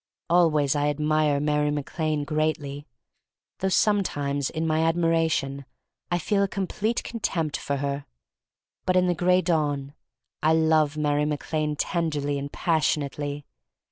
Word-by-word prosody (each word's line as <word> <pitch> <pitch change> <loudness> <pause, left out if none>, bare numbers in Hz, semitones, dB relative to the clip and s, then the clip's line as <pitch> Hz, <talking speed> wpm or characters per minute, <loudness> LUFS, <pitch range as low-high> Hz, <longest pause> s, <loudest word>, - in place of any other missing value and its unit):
Always 155 -5 +4
I 145 0 +1
admire 150 0 +1
Mary 150 0 +1
Mac 145 +3 -4
Lane 155 -2 +1
greatly 145 -1 -2 0.3
— - - -64
though 190 - 0
sometimes 145 -9 +1
in 160 0 -3
my 155 0 +1
ad 165 0 +2
miration 165 -5 +1 0.5
I 175 - +1
feel 200 +4 0
a 200 - +3
complete 200 +4 -2
contempt 170 -9 -2
for 140 - -2
her. 140 0 -3 0.8
But 185 - +3
in 185 0 +4
the 180 - +2
Gray 180 +2 +3
Dawn 145 -4 0 0.5
I 155 +1 +4
love 160 -2 +3
Mary 150 -1 +1
Mac 150 +1 -4
Lane 155 -1 0
tenderly 150 -4 -1
and 140 +1 -6
passionately. 145 -3 -1
155 Hz, 145 wpm, -25 LUFS, 145-165 Hz, 0.8 s, Always